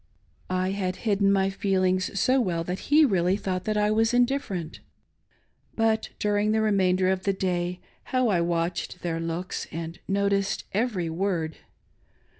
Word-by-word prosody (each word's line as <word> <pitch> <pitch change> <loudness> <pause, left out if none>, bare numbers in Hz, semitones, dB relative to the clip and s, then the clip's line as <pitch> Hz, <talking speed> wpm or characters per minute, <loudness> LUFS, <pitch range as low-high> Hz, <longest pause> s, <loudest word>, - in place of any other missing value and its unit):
'" - - -36 0.2
I 190 - -1
had 185 -2 -2
hidden 200 -2 +3
my 195 0 +2
feelings 185 -1 0
so 260 +1 +3
well 170 -6 -1
that 180 +3 -5
he 305 +1 +6
really 185 -5 +2
thought 185 -2 -3
that 215 -1 0
I 210 0 +2
was 225 +2 +2
indifferent. 245 - 0 1.0
But 225 -1 +1
during 210 +1 +1
the 220 - +2
remainder 190 -3 +2
of 190 -1 -1
the 195 +1 0
day 180 -1 -2 0.3
how 255 -2 +1
I 180 -4 +2
watched 170 +1 -2
their 165 -2 -2
looks 165 +3 -4
and 165 +1 -6
noticed 200 0 0
every 195 -6 0
word 165 -3 -2
190 Hz, 155 wpm, -26 LUFS, 180-210 Hz, 1.0 s, he